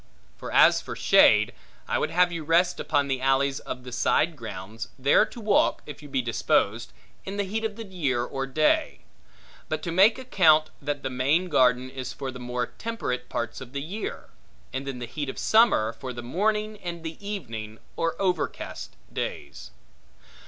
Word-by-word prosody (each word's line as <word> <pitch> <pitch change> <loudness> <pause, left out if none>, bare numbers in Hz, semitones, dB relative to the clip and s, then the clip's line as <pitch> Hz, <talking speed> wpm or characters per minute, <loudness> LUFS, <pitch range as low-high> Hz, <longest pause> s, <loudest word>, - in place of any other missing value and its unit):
For - - -8
as - - +6
for - - -7
shade, - - +5 0.3
I - - 0
would - - 0
have 175 +2 +3
you 165 -2 -4
rest 175 +3 +2
upon 145 -2 +1
the 135 -2 -1
alleys 135 +1 +2
of 125 - -7
the 125 - -9
side 155 +6 +2
grounds, 110 -1 -7
there 140 +10 +4
to - - -11
walk, 215 -2 +2
if 150 -1 -9
you 145 - -11
be 135 -2 0
disposed, 115 -1 0 0.3
in 195 +1 -6
the 205 - +1
heat 215 +3 -3
of 220 -2 -2
the 225 0 -7
year 145 -11 -1
or 135 +2 -4
day; 155 - +1 0.7
but - - -2
to 170 - -3
make 195 +8 +5
account, 165 -12 +4
that 145 0 -3
the 130 - -2
main 145 +8 +1
garden 125 -3 +3
is 130 0 -6
for 135 -2 -5
the 125 - -9
more 125 0 -2
temperate 225 - -4
parts 120 +2 -4
of 130 0 -10
the 140 - -3
year; 200 +8 -6 0.4
and 135 +1 -4
in 135 -2 -4
the 120 - -5
heat 145 +4 -5
of - - -6
summer, 220 - +4
for 130 -1 -7
the 120 0 -7
morning 210 - -1
and 170 -3 -6
the 160 +4 -7
evening, 115 - -6 0.2
or 165 0 -1
overcast 180 -5 -2 0.2
days. 70 0 -5
145 Hz, 185 wpm, -26 LUFS, 125-185 Hz, 0.7 s, as